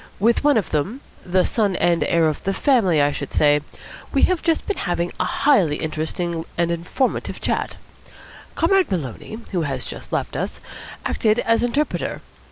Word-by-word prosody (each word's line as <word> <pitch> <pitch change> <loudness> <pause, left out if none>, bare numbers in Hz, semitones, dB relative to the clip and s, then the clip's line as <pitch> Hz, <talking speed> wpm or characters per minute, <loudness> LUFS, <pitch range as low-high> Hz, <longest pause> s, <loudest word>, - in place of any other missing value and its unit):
With 230 +6 +3
one 290 -3 +4
of 210 - -1
them 190 - -1 0.2
the 185 0 +2
son 205 -5 +1
and 175 -1 +2
heir 165 -1 +3
of 155 - -2
the 195 0 -1
family, 220 - +3
I 145 0 +3
should 140 -1 -5
say 150 0 +4 0.5
we - - +2
have 370 -3 +3
just 330 -2 +1
been 410 - -2
having 175 -1 -1
a - - +1
highly 195 - +3
interesting 160 +2 -3
and 170 0 +1
informative 175 +10 -2
chat. - - -2 0.8
Comrade 375 +3 +3
Maloney, 170 - -4
who 180 -4 0
has 135 -4 -3
just - - -8
left - - -2
us, - - -3 0.5
acted 215 0 +2
as 230 -1 +2
interpreter. 280 +5 -1
180 Hz, 170 wpm, -22 LUFS, 160-240 Hz, 0.8 s, one